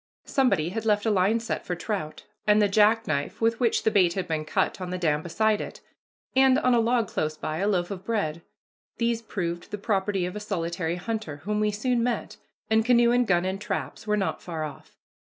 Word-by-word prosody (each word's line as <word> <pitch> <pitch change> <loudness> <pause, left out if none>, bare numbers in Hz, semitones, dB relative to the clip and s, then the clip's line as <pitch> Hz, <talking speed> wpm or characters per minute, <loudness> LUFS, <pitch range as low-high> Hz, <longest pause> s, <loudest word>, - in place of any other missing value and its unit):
Somebody 245 - +2
had 220 +4 -4
left 210 -1 +2
a 220 - +3
line 205 +3 +3
set 230 - -3
for 180 - -3
trout, 175 -4 -4 0.2
and 210 0 +5
the 205 - +4
jackknife 210 -8 +2
with 225 0 +1
which 235 -3 +2
the 220 - +3
bait 180 -5 +4
had 185 -1 -3
been 155 -1 -2
cut 185 - 0
on 180 - -4
the 185 - -3
dam 155 -4 +1
beside 215 +5 +1
it, - - -7 0.6
and, 265 0 +5
on 255 - +3
a 240 - +4
log 230 -1 +2
close 155 -3 -2
by, 155 0 -3
a 200 - +1
loaf 180 -2 0
of 190 -2 -6
bread. 190 -8 -1 0.6
These 235 -1 0
proved 175 -6 -4
the 205 - -4
property 195 -2 0
of 180 - -5
a - - -3
solitary 170 -4 -2
hunter, 180 -6 -4
whom 210 +1 0
we 215 0 +2
soon 235 +4 0
met, 240 0 -2 0.3
and 220 0 +3
canoe 235 0 +4
and 245 -1 +3
gun 175 -1 +2
and 190 +1 -3
traps 210 +1 -4
were 210 0 +2
not 195 - -1
far 165 -3 -4
off. 150 -2 -9
205 Hz, 215 wpm, -26 LUFS, 175-225 Hz, 0.6 s, and